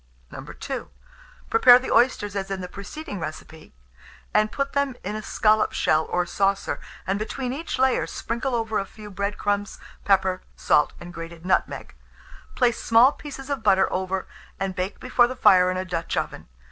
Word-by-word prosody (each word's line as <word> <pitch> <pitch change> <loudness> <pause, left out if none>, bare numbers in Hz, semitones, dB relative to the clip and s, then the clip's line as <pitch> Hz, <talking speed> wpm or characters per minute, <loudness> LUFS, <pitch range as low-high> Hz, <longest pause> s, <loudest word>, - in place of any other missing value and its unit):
II. - - -6 0.6
Prepare 245 +2 +8
the 255 - -4
oysters 205 -5 +2
as 195 -1 -3
in 195 -1 -3
the 180 - -5
preceding 205 - -7
recipe, 160 0 -8 0.6
and 215 0 +3
put 275 +2 -2
them 280 -2 0
in 205 +3 -4
a 215 - -4
scallop 215 0 +2
shell 155 0 +2
or 180 0 0
saucer, 195 +2 0 0.3
and 195 +2 -1
between 250 +4 -3
each 315 +2 -4
layer 260 -1 +2
sprinkle 240 +2 -3
over 225 -2 -1
a 195 - -3
few 210 0 -11
bread 200 +2 -3
crumbs, 205 -1 -1 0.3
pepper, 190 -2 +2
salt, 150 - +2
and 175 0 -10
grated 165 0 -9
nutmeg; 185 - -1 0.6
place 240 -2 +2
small 235 +4 +6
pieces 280 -2 -9
of 280 -4 -2
butter 190 -3 +4
over, 190 0 -2 0.3
and 195 -1 -2
bake 185 +2 -4
before 250 -1 +3
the 255 - -6
fire 185 -7 +5
in 185 - -1
a 185 - -3
Dutch 170 -2 -3
oven. - - -3
205 Hz, 170 wpm, -24 LUFS, 185-245 Hz, 0.6 s, Prepare